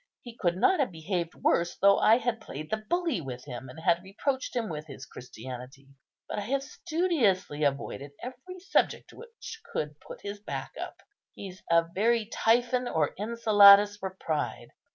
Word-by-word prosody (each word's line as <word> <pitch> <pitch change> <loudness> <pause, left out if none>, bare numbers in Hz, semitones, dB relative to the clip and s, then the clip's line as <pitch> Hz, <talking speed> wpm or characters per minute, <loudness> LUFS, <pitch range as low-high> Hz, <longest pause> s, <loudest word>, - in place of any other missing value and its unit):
He 240 -2 -10
could 175 -5 0
not 355 - +3
have 270 -8 +1
behaved 170 +1 -3
worse 175 0 +1
though 200 +1 +5
I 225 - +6
had 235 -2 -2
played 155 -6 -8
the 220 - +1
bully 320 - -1
with 130 -3 -7
him, 125 -1 -7
and 130 - -10
had 170 +1 +2
reproached 255 +9 -3
him 235 -3 0
with 155 -3 -6
his 135 -2 -9
Christianity. 125 +3 -10 0.4
But - - -3
I 205 - -4
have 270 +4 0
studiously 280 - 0
avoided 140 0 -2
every 260 +10 -8
subject 385 - 0
which 455 -1 -10
could 150 -1 -3
put - - -11
his 205 0 -6
back - - -5
up. - - -6 0.4
He's 190 -2 -9
a 165 0 +4
very 225 +2 +2
Typhon 245 +3 +1
or 155 -7 0
Enceladus 205 -2 +6
for 190 -2 -6
pride. 155 -2 -3
200 Hz, 170 wpm, -28 LUFS, 155-245 Hz, 0.4 s, I